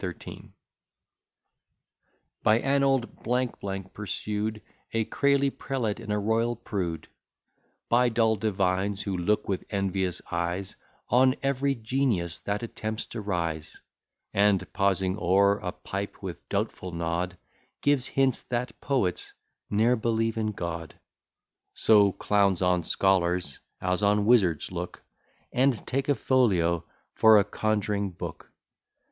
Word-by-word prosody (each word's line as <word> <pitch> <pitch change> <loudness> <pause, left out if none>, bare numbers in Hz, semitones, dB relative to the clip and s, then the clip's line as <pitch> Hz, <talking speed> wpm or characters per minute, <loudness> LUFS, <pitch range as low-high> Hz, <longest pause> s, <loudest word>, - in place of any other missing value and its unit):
By 110 +1 +4
an 140 +3 +1
old 135 -3 +1 0.8
pursued, 105 +1 -3 0.3
A 115 -1 +1
crazy 140 +2 +2
prelate, 120 -7 -3
and 110 -2 -6
a 105 - +1
royal 115 +3 +1
prude; 90 -8 -4 0.8
By 120 +1 +4
dull 115 -1 +3
divines, 95 -1 0
who 100 -2 -2
look 105 +4 0
with 95 -2 -2
envious 95 -3 -1
eyes 85 +3 -2 0.3
On 130 +1 +4
ev'ry 135 0 +1
genius 110 -8 0
that 100 +2 -3
attempts 110 -1 -4
to 115 - -4
rise; 85 -6 -3 0.5
And 100 -1 +2
pausing 95 0 +1
o'er 100 +3 +3
a 90 - -3
pipe, 100 +2 -6
with 90 -4 -7
doubtful 90 - -2
nod, 85 +2 -2 0.5
Give 145 -3 +3
hints, 135 -1 +2
that 120 -1 -4
poets 125 -11 -1 0.4
ne'er 110 +4 +3
believe 115 -1 0
in 110 -1 0
God. 85 -4 -5 0.8
So 105 -2 +5
clowns 100 -2 +1
on 90 -1 +2
scholars 90 -4 +1 0.2
as 90 +1 -1
on 105 0 +3
wizards 95 -11 +3
look, 90 -1 -6 0.5
And 130 -3 +2
take 135 +2 -2
a 145 - +4
folio 90 -10 +2 0.3
for 110 -1 +7
a 100 - +5
conj'ring 105 -1 -1
book. - - -7
105 Hz, 120 wpm, -27 LUFS, 90-115 Hz, 0.8 s, for